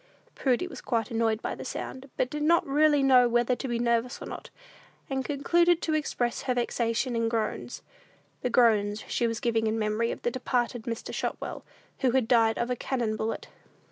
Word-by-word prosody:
Prudy 260 +5 +1
was 365 - -9
quite 230 -3 -1
annoyed 225 -1 0
by - - -2
the - - -7
sound, 265 +1 -6
but 250 - 0
did 300 - -3
not 335 +3 +4
really 290 0 +3
know 250 -2 +6
whether 240 +1 +2
to 265 - -5
be 240 -2 -1
nervous 235 +1 0
or - - -7
not, - - -8 0.6
and 265 0 0
concluded 340 +5 +2
to 315 - 0
express 250 -6 -1
her 255 -2 -1
vexation 240 0 0
in 230 0 +1
groans: 225 -2 -3 0.6
the 250 - 0
groans 215 -4 +3
she 235 - 0
was 230 0 -2
giving 225 -3 +1
in 220 +1 0
memory 215 +1 0
of - - -5
the 240 - +1
departed 245 -2 -1
Mr. 230 -1 -5
Shotwell, - - -4 0.4
who 260 - +2
had 260 -4 +2
died 225 -2 +4
of 240 +1 -1
a - - +1
"cannon 235 -3 -2
bullet." 220 +1 -3
240 Hz, 195 wpm, -28 LUFS, 230-265 Hz, 0.6 s, know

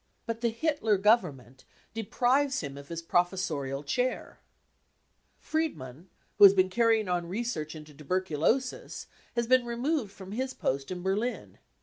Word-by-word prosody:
But 230 0 -4
the 235 - +2
Hitler 230 -4 +1
Government 145 - +1 0.3
deprives 255 +5 +1
him 140 -3 -6
of 140 0 -10
his 170 +1 -6
professorial 165 -6 -1
chair! 250 - -2 1.0
Friedmann, 175 - -4 0.3
who - - +7
has 200 0 +10
been 185 0 +3
carrying 225 -1 +3
on 175 -1 -1
research 180 -7 -3
into! 150 -1 -11
tuberculosis, 185 - -1 0.3
has 235 0 +1
been 255 +1 +4
removed 240 0 -2
from 190 -1 -11
his 260 +4 -3
post 135 +1 -2
in 180 -1 -5
Berlin. 210 +6 -2
195 Hz, 135 wpm, -29 LUFS, 155-240 Hz, 1.0 s, has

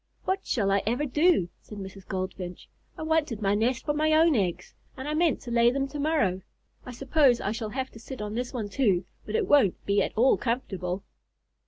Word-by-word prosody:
"What 380 +1 -1
shall 200 -5 +1
I 200 0 +3
ever 245 +6 +1
do?" 295 - +3
said 210 - -11
Mrs. 190 -1 -9
Goldfinch. 185 -1 -5 0.3
"I - - -5
wanted 315 -8 0
my 200 -2 +1
nest 235 +5 0
for 295 - +1
my 310 +1 +2
own 320 -1 +5
eggs, 185 -6 -1 0.2
and 265 +2 -6
I 300 - -1
meant 320 0 +2
to 240 - -7
lay 235 0 +5
them 275 +2 -1
to 295 - -6
morrow. 280 - +1 0.5
I - - -5
suppose 265 0 +3
I 205 - -2
shall 220 -1 -4
have 260 +3 -4
to 225 - -12
sit 260 +3 -8
on 210 0 -4
this 245 +2 -3
one 225 -5 -3
too, 195 -7 +1 0.2
but 215 - -3
it - - +1
won't 270 -11 +3
be 200 0 +2
at - - -1
all 255 +4 +5
comfortable." 195 -7 -3
240 Hz, 215 wpm, -27 LUFS, 200-290 Hz, 0.5 s, own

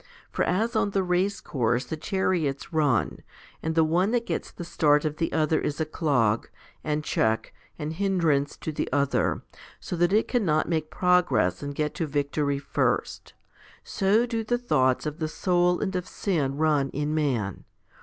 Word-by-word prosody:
For - - 0
as 225 +6 0
on 205 - +2
the 190 - +2
race 185 +3 0
course 125 -1 -1
the 160 - -4
chariots 165 -5 -1
run, 145 -8 +1 0.4
and 160 0 -2
the 165 - +5
one 175 +5 +2
that 235 -1 +1
gets - - -3
the 175 - -8
start 150 -3 +2
of 155 0 -2
the 165 - -1
other 155 0 +2
is 145 - -3
a 160 - +1
clog, 125 -9 +1 0.3
and 150 0 -1
check, 110 -6 0 0.2
and 155 0 -4
hindrance 165 -6 +1
to 160 - -3
the 150 - -3
other, 140 0 +1 0.4
so - - -5
that 175 +1 +2
it 215 +2 +3
cannot 170 -11 +1
make 160 -2 -1
progress 180 -1 +2
and 145 0 -5
get 150 0 -1
to 165 - -2
victory 145 0 -1
first, 140 - -2 0.5
so 205 +5 +2
do 230 -2 -2
the 240 +2 0
thoughts 130 - +1
of 150 0 -4
the 155 - -1
soul 175 +2 +1
and 190 -2 -2
of 180 -1 -2
sin 145 -9 -1
run 150 -3 +2
in 145 +2 -2
man. 125 - -1
155 Hz, 175 wpm, -26 LUFS, 145-180 Hz, 0.5 s, the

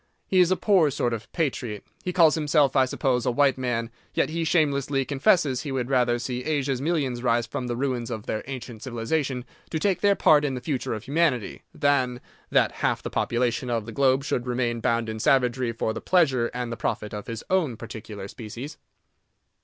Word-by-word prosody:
He 190 - +3
is 180 -1 +5
a 185 - +3
poor 185 -8 +4
sort 120 -3 -1
of 115 -1 -6
patriot; 125 - -2 0.2
he 180 - -2
calls 165 -4 +5
himself, 150 -2 +2
I 130 -1 +5
suppose, 130 -2 0
a - - +1
white 135 +2 +3
man, 120 -3 -2 0.2
yet - - +1
he 165 +1 -1
shamelessly 145 -4 +1
confesses 140 -1 +2
he 145 - -5
would 130 -1 -2
rather 120 -2 +3
see 125 0 -4
Asia's 140 -4 -1
millions 140 -6 -1
rise 120 -1 +2
from 125 +3 -4
the 120 - -2
ruins 125 -2 -2
of 110 -3 -5
their 110 - -2
ancient 125 -4 -7
civilization 125 +2 -2 0.2
to 160 - -2
take 190 +3 0
their 200 -1 +4
part 150 -5 +5
in 135 -3 -1
the - - -3
future 130 -4 -2
of 110 - -7
humanity, 140 -5 0
than 130 -4 +1 0.3
that - - +3
half - - -1
the - - -5
population 120 +1 0
of 115 -3 -1
the 115 - -7
globe 135 +2 +2
should 125 -3 -2
remain 120 -1 -1
bound 115 0 0
in 110 0 -4
savagery 125 0 +2
for 110 -1 -2
the - - -6
pleasure 135 -10 +3
and 125 -1 -4
the 115 - -4
profit 105 - -3
of 105 0 -6
his 115 -1 -5
own 160 -11 +1
particular 110 -3 -8
species. 120 +8 -8
130 Hz, 200 wpm, -25 LUFS, 120-145 Hz, 0.3 s, is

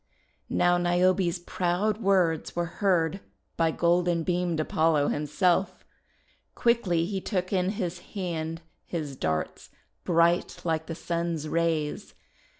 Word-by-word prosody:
Now 175 0 +3
Niobe's 175 +1 +2
proud 180 +5 -1
words 185 -6 +1
were 170 +2 -4
heard 180 -2 +2 0.4
by 165 -1 +2
golden 170 0 +2
beamed 175 -1 0
Apollo 155 -1 +2
himself. 180 +5 0 0.7
Quickly 195 -9 +2
he 195 +1 -3
took 185 -1 -2
in 185 -1 +2
his 180 -4 -3 0.2
hand 165 -3 -3 0.2
his 150 -5 -4
darts 80 -9 -3 0.3
bright 170 0 +2
like 160 -1 -1
the 165 - -4
Sun's 170 -2 -2
rays. 160 -2 -1
175 Hz, 115 wpm, -27 LUFS, 165-185 Hz, 0.7 s, Now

